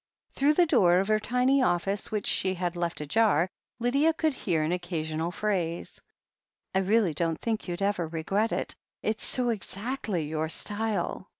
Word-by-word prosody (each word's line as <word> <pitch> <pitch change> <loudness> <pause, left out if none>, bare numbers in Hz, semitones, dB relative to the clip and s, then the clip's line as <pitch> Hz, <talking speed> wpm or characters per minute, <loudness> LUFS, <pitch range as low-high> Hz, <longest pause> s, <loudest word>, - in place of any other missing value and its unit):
Through 290 +3 +3
the 355 - +5
door 190 - +4
of 195 +3 +1
her 215 0 +3
tiny 250 +4 +2
office, 195 +1 0
which 210 -2 -2
she 190 0 +2
had 175 -1 -2
left 170 -2 -2
ajar, 180 +1 +3 0.3
Lydia 275 +7 +2
could 315 -2 +1
hear 170 -10 0
an 155 - 0
occasional 165 -2 -2
phrase: 175 -3 -2 0.7
"I 190 - +3
really 195 -2 +2
don't 165 +1 -1
think 225 -3 -2
you'd 175 +2 -3
ever 195 -4 0
regret 195 +7 -1
it... - - -1 0.3
it's 215 0 -1
so 250 -2 0
exactly 215 -3 -3
your 155 +1 -2
style. 205 -1 -2
195 Hz, 165 wpm, -28 LUFS, 170-230 Hz, 0.7 s, the